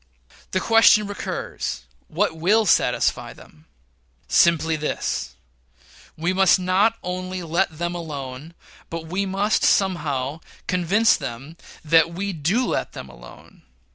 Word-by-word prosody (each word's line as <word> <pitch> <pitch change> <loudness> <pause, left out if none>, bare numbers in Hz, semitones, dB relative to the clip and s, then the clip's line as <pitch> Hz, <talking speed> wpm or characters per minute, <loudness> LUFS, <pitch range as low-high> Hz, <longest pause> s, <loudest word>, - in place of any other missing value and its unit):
The 185 - 0
question 225 0 +5
recurs, 200 - -5 0.2
what 175 0 -1
will 205 +7 +2
satisfy 185 - +1
them? 75 +1 -19 0.6
Simply 165 -1 +3
this: 65 - -3 0.8
We 170 +3 -1
must 190 0 +4
not 190 +5 +2
only 185 0 -4
let 165 0 -1
them 175 +1 -2
alone, 150 -2 -7 0.3
but 165 -1 -6
we 190 +4 -2
must, 200 +3 0
somehow, 150 -7 0 0.3
convince 195 +5 +2
them 130 +7 -7 0.3
that 165 +2 +3
we 200 +2 -3
do 180 - 0
let - - -2
them - - -9
alone. - - -15
175 Hz, 120 wpm, -22 LUFS, 155-195 Hz, 0.8 s, question